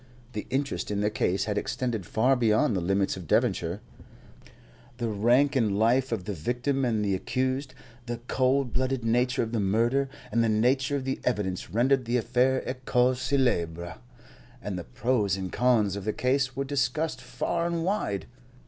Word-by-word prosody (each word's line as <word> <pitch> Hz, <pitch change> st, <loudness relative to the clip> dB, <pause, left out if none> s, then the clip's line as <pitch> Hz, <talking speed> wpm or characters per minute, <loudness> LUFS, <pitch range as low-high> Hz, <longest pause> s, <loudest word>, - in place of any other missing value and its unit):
The 105 Hz, -, -5 dB
interest 135 Hz, +2 st, -2 dB
in 100 Hz, -1 st, -1 dB
the 105 Hz, +1 st, +1 dB
case 100 Hz, -1 st, 0 dB
had 105 Hz, -1 st, 0 dB
extended 115 Hz, -7 st, -3 dB
far 125 Hz, +5 st, +3 dB
beyond 115 Hz, +1 st, +2 dB
the 95 Hz, -, 0 dB
limits 95 Hz, +2 st, +1 dB
of 90 Hz, -4 st, -9 dB
Devonshire. -, -, +1 dB, 1.2 s
The 120 Hz, -, -2 dB
rank 120 Hz, +7 st, +3 dB
in 110 Hz, -6 st, +2 dB
life 120 Hz, +4 st, +2 dB
of 110 Hz, -5 st, -2 dB
the 105 Hz, -, -4 dB
victim 125 Hz, -, -1 dB
and 110 Hz, -4 st, +1 dB
the 100 Hz, -, +1 dB
accused, 130 Hz, +7 st, -2 dB, 0.3 s
the 120 Hz, 0 st, -3 dB
cold 130 Hz, -1 st, +1 dB
blooded 130 Hz, -1 st, -1 dB
nature 125 Hz, +3 st, +2 dB
of 115 Hz, -, -5 dB
the 115 Hz, -, 0 dB
murder, 115 Hz, +7 st, +1 dB, 0.2 s
and 115 Hz, -, +2 dB
the 115 Hz, -, +2 dB
nature 130 Hz, +6 st, +2 dB
of 135 Hz, -2 st, -3 dB
the 135 Hz, -, -2 dB
evidence 100 Hz, -8 st, -1 dB
rendered 125 Hz, +6 st, +2 dB
the 120 Hz, +2 st, +1 dB
affair 125 Hz, +3 st, +1 dB
a -, -, -2 dB
cause 125 Hz, 0 st, +1 dB
célèbre, 85 Hz, -, 0 dB, 0.6 s
and 105 Hz, -5 st, -5 dB
the 90 Hz, -, -5 dB
pros 110 Hz, -5 st, 0 dB
and 95 Hz, -2 st, -5 dB
cons 115 Hz, -6 st, +2 dB
of 100 Hz, -, -5 dB
the 110 Hz, -, 0 dB
case 130 Hz, 0 st, 0 dB
were 140 Hz, 0 st, -2 dB
discussed 145 Hz, 0 st, -1 dB
far 170 Hz, +5 st, -2 dB
and 170 Hz, -1 st, -1 dB
wide. 175 Hz, -, -1 dB
120 Hz, 175 wpm, -27 LUFS, 105-130 Hz, 1.2 s, far